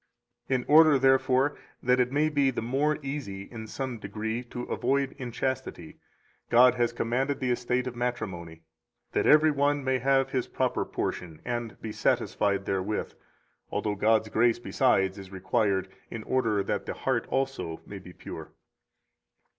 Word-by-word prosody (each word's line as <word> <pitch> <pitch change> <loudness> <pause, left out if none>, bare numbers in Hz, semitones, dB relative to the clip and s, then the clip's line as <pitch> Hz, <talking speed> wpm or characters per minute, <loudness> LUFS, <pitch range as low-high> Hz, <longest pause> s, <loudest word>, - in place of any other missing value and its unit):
In 130 -2 0
order, 155 -1 +7
therefore, 135 +1 +3 0.3
that 125 +1 +3
it 125 0 +2
may 150 +2 +2
be 140 -3 +2
the 125 - -3
more 140 +5 +1
easy 135 -9 -5
in 110 +1 -9
some 130 0 -4
degree 110 +3 -3
to 120 +1 -6
avoid 135 +1 0
inchastity, 125 -7 -4 0.5
God 125 +1 +7
has 120 -2 +1
commanded 135 +4 -1
the 130 -2 0
estate 125 +1 0
of 125 -1 -5
matrimony, 95 -10 -4 0.5
that - - +1
every 155 +1 +6
one 145 0 +1
may 130 0 +1
have 135 +1 +2
his 130 -2 -1
proper - - -1
portion 80 -4 -4
and 120 -2 -4
be 110 - -4
satisfied 100 -2 0
therewith; 95 +2 -2 0.6
although 105 - -1
God's 110 +2 +2
grace 115 +2 +3
besides 100 -6 +1
is 95 -1 -11
required 95 0 0 0.2
in 115 - -6
order 115 -6 +1
that - - -3
the - - -3
heart - - -1
also 135 -12 -2
may 100 - -8
be 90 -1 -12
pure. - - -9
120 Hz, 155 wpm, -28 LUFS, 105-135 Hz, 0.6 s, order